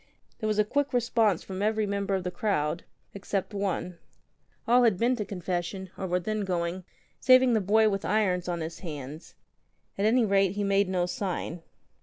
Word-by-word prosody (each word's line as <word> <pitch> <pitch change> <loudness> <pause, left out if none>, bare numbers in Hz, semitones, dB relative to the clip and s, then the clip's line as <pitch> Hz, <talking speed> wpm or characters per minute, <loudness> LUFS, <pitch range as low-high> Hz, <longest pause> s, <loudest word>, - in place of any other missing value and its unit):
There 215 - -2
was 215 -1 0
a 210 - +5
quick 285 +5 -1
response 230 -6 +2
from 190 0 -6
every 215 +1 +1
member 200 -1 -1
of 190 - -2
the 180 - -3
crowd 175 -4 -1
— - - -42
except 200 +1 -3
one. 185 -3 -3 0.7
All 245 +2 +5
had 225 -6 +4
been 240 +5 +2
to 210 - -3
confession, 180 0 -4
or 190 - -4
were 180 0 +1
then 215 +4 -2
going, 180 -1 -2 0.3
saving 255 -1 +6
the 220 - +2
boy 215 +3 +4
with 195 -2 -1
irons 185 -4 +1
on 175 -1 -2
his 160 +1 -6
hands. 150 -2 -8 0.6
At 200 - +2
any 235 +2 +4
rate, 195 -2 +3
he 205 0 -2
made 200 -1 +2
no 180 -2 +1
sign. 180 -2 -4
195 Hz, 190 wpm, -28 LUFS, 180-215 Hz, 0.7 s, saving